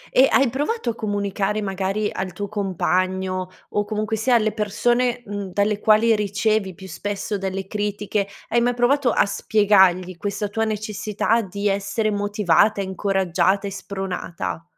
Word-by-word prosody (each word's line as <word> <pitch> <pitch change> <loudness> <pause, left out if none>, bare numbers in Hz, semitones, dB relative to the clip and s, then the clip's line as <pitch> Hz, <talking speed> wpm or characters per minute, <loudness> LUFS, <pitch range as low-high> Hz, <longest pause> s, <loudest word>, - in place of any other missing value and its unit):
E 265 +1 +7
hai 270 - +4
provato 290 - -1
a - - -9
comunicare 205 -1 -1
magari 195 +2 -1
al 185 -1 -4
tuo 205 +3 -4
compagno 185 -2 -1 0.2
o 205 - 0
comunque 215 +1 -2
sia 240 +3 +2
alle 215 -2 +3
persone, 240 +4 0
mhmm, 200 -2 -5
dalle 205 +2 +1
quali 220 +1 +4
ricevi 205 -1 0
più 190 0 -11
spesso 205 +1 -4
delle 190 0 -3
critiche, 205 0 -2 0.2
hai 235 +1 +2
mai 245 0 +1
provato 250 +2 +3
a - - +3
spiegargli 190 -3 +3
questa 205 +2 -3
tua 225 +1 -1
necessità 215 +1 -1
di 200 0 -3
essere 200 +2 0
motivata, 205 0 +2
incoraggiata 190 0 0
e 200 - -3
spronata? 180 - -5
205 Hz, 145 wpm, -22 LUFS, 195-215 Hz, 0.2 s, E